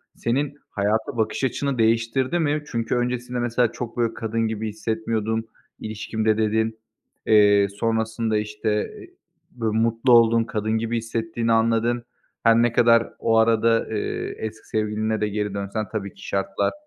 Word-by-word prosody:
senin 140 +5 -1
hayata 110 +4 -1
bakış 110 +4 -1
açını 135 +1 -1
değiştirdi 115 +7 +1
mi? 150 -2 0
Çünkü 115 -2 -2
öncesinde 125 0 -2
mesela, 120 -1 +1
"Çok 120 -1 -6
böyle 115 -1 +1
kadın 115 0 -2
gibi 110 0 -3
hissetmiyordum 110 +1 -2 0.3
ilişkimde," 110 0 -1
dedin. 110 0 0 0.5
Eee, 100 -2 +5
sonrasında, 110 +1 -1
işte, 105 0 -2 0.6
böyle, 110 -2 -2
mutlu 115 +2 +2
oldun, 115 -1 +6
kadın 110 -1 -3
gibi 115 +1 -1
hissettiğini 115 0 -2
anladın. 115 +1 +2 0.4
Her 115 0 +6
ne 120 -1 +3
kadar 115 -1 +4
o 115 -1 +2
arada, 115 0 +3
eee, 105 - -3
eski 110 0 -7
sevgiline 110 0 -1
de 105 - +1
geri 105 -1 -2
dönsen 100 +2 -3
tabii 100 -3 -4
ki 100 - -12
şartlar, 95 0 -1
115 Hz, 140 wpm, -23 LUFS, 110-115 Hz, 0.6 s, oldun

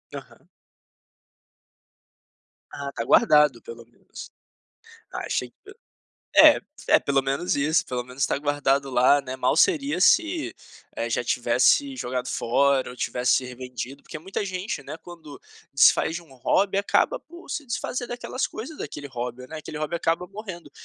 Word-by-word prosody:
Aham. - - -12 2.2
Ah, 140 -1 -6
tá 115 - -4
guardado, 150 - +4
pelo 115 0 -11
menos. 120 - -13 0.8
Ah, - - -5
achei - - -2
que 405 - -18 0.7
é - - +8 0.3
é, - - +6
pelo 140 -1 +1
menos 135 +6 -1
isso, 155 +3 +1
pelo 125 -1 -3
menos 130 +2 -2
tá - - -1
guardado 140 -2 0
lá, 130 +3 +4
né. 130 -1 -6
Mal 130 +3 +1
seria 285 - +2
se, 325 - +3 0.4
eh, - - -2
já - - 0
tivesse 280 -1 +2
jogado 125 - -3
fora 135 +2 +1
ou 125 - -11
tivesse 125 +1 +1
revendido, 125 +1 -7
porque 155 - -8
muita 190 +5 -4
gente, 185 -5 -4
né, 155 - -8
quando 160 -5 -12 0.3
desfaz 140 +3 +4
de 175 - -7
um 140 -6 -18
hobby, 195 +10 +1
acaba 205 - +2
por 345 +2 -15
se 300 - -4
desfazer 245 0 -3
daquelas 245 +2 -3
coisas 275 +8 -8
daquele 145 -1 -7
hobby, 125 0 -6
né. 160 +2 -8
Aquele 150 0 -8
hobby 155 +2 -3
acaba 165 +2 -1
morrendo 190 -7 -9
145 Hz, 155 wpm, -25 LUFS, 130-190 Hz, 2.2 s, é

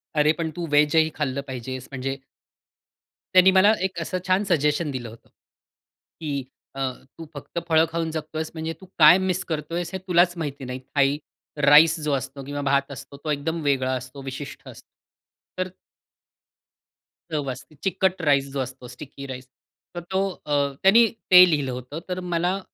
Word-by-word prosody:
"अरे 150 0 +4
पण 165 -1 -2
तू 175 - -3
व्हेजही 150 +2 +4
खाल्लं 140 -2 -2
पाहिजेस," 130 0 -6
म्हणजे 135 +1 -3 1.2
त्यानी 185 +1 +7
मला 190 +3 +6
एक 185 -2 -9
असं 185 +3 -3
छान 185 +2 +3
सजेशन 150 -1 +1
दिलं 120 -3 -5
होतं, 115 +1 -16 0.9
की 145 -4 -3 0.3
अ, 135 -1 -1 0.3
तू 165 - -8
फक्त 145 +3 -6
फळं 160 0 +4
खाऊन 165 -1 -2
जगतोयेस 155 0 -4
म्हणजे 160 0 -4
तू - - -11
काय 155 +4 +9
मिस 185 -1 -1
करतोयेस 165 +3 -3
हे - - -1
तुलाच 175 0 +4
माहिती 140 -4 -5
नाही, 125 +1 -5 0.2
थाई 140 0 +3 0.5
राईस 155 +3 +7
जो 150 - 0
असतो 135 0 -4
किंवा 145 +1 -4
भात 140 0 +1
असतो 140 +1 -10
तो 155 - -1
एकदम 160 +3 -2
वेगळा 130 -2 +1
असतो, 130 +2 -6
विशिष्ट 135 +1 -8
असतो. - - -13 0.7
तर 185 0 -1 1.6
चव 145 -3 -2
असते, 135 +4 -11
चिकट 190 0 0
राईस 140 -3 +2
जो 140 - -2
असतो 130 -1 -6
स्टिकी 140 +2 -10
राईस. 130 -1 -8 0.5
तर 175 - -3
तो 190 - +1 0.2
अ, 145 - -2 0.3
त्यानी 225 +5 +7 0.3
ते 180 0 +10
लिहिलं 145 -5 0
होतं. 125 +5 -6
तर 180 0 -2
मला 180 +1 -1
150 Hz, 165 wpm, -24 LUFS, 135-170 Hz, 1.6 s, ते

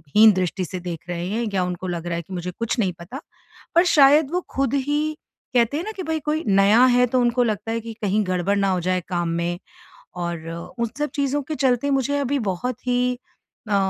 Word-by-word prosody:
हीन 215 0 +9
दृष्टि 185 0 -1
से 185 +2 -6
देख 175 -1 -6
रहे 175 0 -3
हैं 230 +3 -1
या 185 -2 +1
उनको 180 +1 -4
लग 175 -1 -4
रहा 170 - -1
है - - -3
कि 190 - -11
मुझे 180 0 -4
कुछ 230 +2 -1
नहीं 185 -5 +1
पता। 250 - -8 0.5
पर 345 +2 +6
शायद 290 0 +6
वो 360 - +1 0.2
खुद 275 -1 +1
ही 295 +3 0 0.4
कहते 240 +4 +3
हैं 335 - -2
न - - -4
कि 375 - -4
भई 320 -1 -2
कोई 305 +2 -2
नया 200 +5 +5
है 250 0 +5
तो 250 +1 +1
उनको 245 +1 +2
लगता 225 0 -2
है 230 - -1
कि 230 0 -7
कहीं 205 +1 +1
गड़बड़ 185 +2 +1
ना 195 -1 +2
हो 180 -1 0
जाए 185 0 0
काम 175 -2 -1
में 175 +1 -2 0.7
और 165 -1 -4 0.3
उन 235 -1 -1
सब 295 0 -1
चीज़ों 280 0 0
के - - 0
चलते 260 0 +1
मुझे 275 +1 +1
अभी 280 0 0
बहुत 250 +7 -5
ही 250 0 +1 0.5
अ, 205 - +1
230 Hz, 225 wpm, -23 LUFS, 185-275 Hz, 0.7 s, हीन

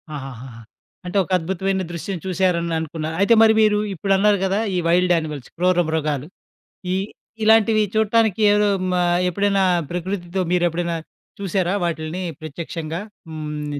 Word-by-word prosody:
ఆహాహాహా! 130 -4 -9 0.4
అంటే 180 +3 -2
ఒక 185 - -12
అద్భుతమైన 190 +2 -2
దృశ్యం 175 +3 -4
చూశారననుకున్నారు. 170 -3 -1
అయితే 200 +4 +5
మరి 220 0 +6
మీరు 210 -1 +4 0.2
ఇప్పుడన్నారు 195 +2 +2
గదా! 195 +2 0 0.2
ఈ - - +1
వైల్డ్ 180 +1 +3
యానిమల్స్ 150 -5 -4
క్రూర 180 0 +2
మృగాలు 150 -3 -1 0.7
ఈ - - +1 0.5
ఇలాంటివి 220 0 +5
చూట్టానికి 220 -1 +2
ఎవరో 210 0 +3 0.2
మ - - +1 0.3
ఎప్పుడైనా 200 +1 +1 0.3
ప్రకృతితో 180 +1 -3
మీరు 180 -1 +2
ఎప్పుడైనా 170 0 -2 0.4
చూసారా 190 -1 0
వాటిల్ని 165 +1 -3 0.2
ప్రత్యక్షంగా? 160 +2 -5 0.3
హ్మ్. 150 -2 -5
175 Hz, 125 wpm, -21 LUFS, 160-195 Hz, 0.7 s, మరి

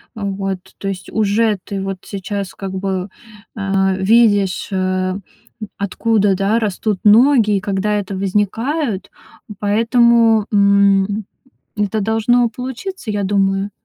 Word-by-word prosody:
А, 215 - -6
вот. 195 -1 -3 0.2
То 195 - -6
есть 185 -1 -5
уже 215 0 +1
ты 195 -1 -4
вот 195 0 -4
сейчас 200 0 -5
как 195 -1 -6
бы, 190 0 -3 0.5
а, 195 -2 0
видишь, 205 -1 +2
а, 185 -1 -1 0.5
м, 215 - -6
откуда, 205 0 +1
да, 200 +4 +1
растут 210 -2 -2
ноги, 220 -1 +5
и - - -1
когда 200 +1 -1
это 200 -1 -2
возникает. 205 - -1 0.5
Поэтому, 230 +1 +3
м, 200 0 +3 0.5
это 210 +1 0
должно 225 +3 +2
получиться, 255 - -6
я 205 -1 -2
думаю. 195 0 0
205 Hz, 125 wpm, -18 LUFS, 195-220 Hz, 0.5 s, ноги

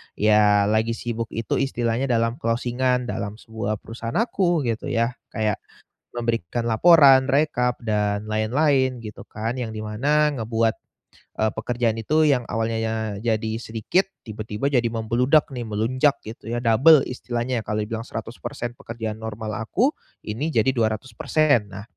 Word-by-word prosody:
ya, 105 -1 +4
lagi 110 +1 +1
sibuk 115 -1 -4
itu 115 -1 -1
istilahnya 125 -1 0
dalam 115 0 0
closing-an 125 +2 0
dalam 100 +1 -4
sebuah 110 -2 -4
perusahaan 115 0 -6
aku, 185 -8 +1
gitu 115 -1 -2
ya, 115 0 +1 0.2
kayak, 110 -2 0 0.5
memberikan 115 -1 -2
laporan, 135 +2 +7
rekap 125 -4 +1
dan 105 -2 -1
lain-lain, 130 +4 +1
gitu 105 -2 -9
kan, 110 +3 -4
yang 120 -3 -4
di 110 - -6
mana 145 +8 +2
ngebuat, 115 -1 0 0.6
eee, 110 0 +2
pekerjaan 115 0 -1
itu 155 +8 +2
yang 130 -4 +3
awalnya, 110 -1 -2
jadi 110 0 -1
sedikit, 115 - 0 0.2
tiba-tiba 110 +5 -3
jadi 125 -3 +2
membludak 120 +7 +2
nih, 125 -3 -5
melonjak 130 +7 +1
gitu 110 0 -10
ya, 120 - -1
double 135 +6 +6
istilahnya, 120 0 -2
kalau 105 0 -1
dibilang 115 +2 -5
100% 115 +1 -6
pekerjaan 110 -1 -6
normal 110 -2 -5
aku, 215 - +1 0.3
ini 115 +8 -3
jadi 115 +3 +3
200%. 115 +3 +1
Nah, 100 +1 -7
115 Hz, 140 wpm, -23 LUFS, 110-125 Hz, 0.6 s, laporan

